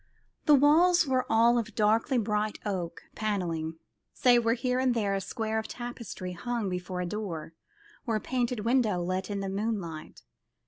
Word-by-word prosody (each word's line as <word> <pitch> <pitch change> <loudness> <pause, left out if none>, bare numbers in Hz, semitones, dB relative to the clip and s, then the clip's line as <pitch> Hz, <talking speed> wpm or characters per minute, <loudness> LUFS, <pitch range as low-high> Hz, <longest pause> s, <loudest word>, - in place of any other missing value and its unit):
The 300 - +8
walls 330 +5 +5
were 260 -2 0
all 235 +2 +5
of 225 -2 -5
darkly 220 +4 +2
bright 210 -1 0
oak 180 -5 -3
panelling, 170 -7 -2 0.4
save 245 -2 +4
where 230 +1 +2
here 250 +1 0
and 255 -2 +2
there 205 -3 0
a 195 - -1
square 220 +2 -2
of 220 - -5
tapestry 235 -6 -6
hung 230 +3 -3
before 180 0 -4
a - - -2
door, 175 -5 -5 0.5
or 225 - +1
a - - +1
painted 245 -1 -1
window 230 -4 +2
let 185 +2 -2
in 200 -1 -2
the 195 - -3
moonlight. 195 -6 -4
215 Hz, 170 wpm, -29 LUFS, 185-240 Hz, 0.5 s, The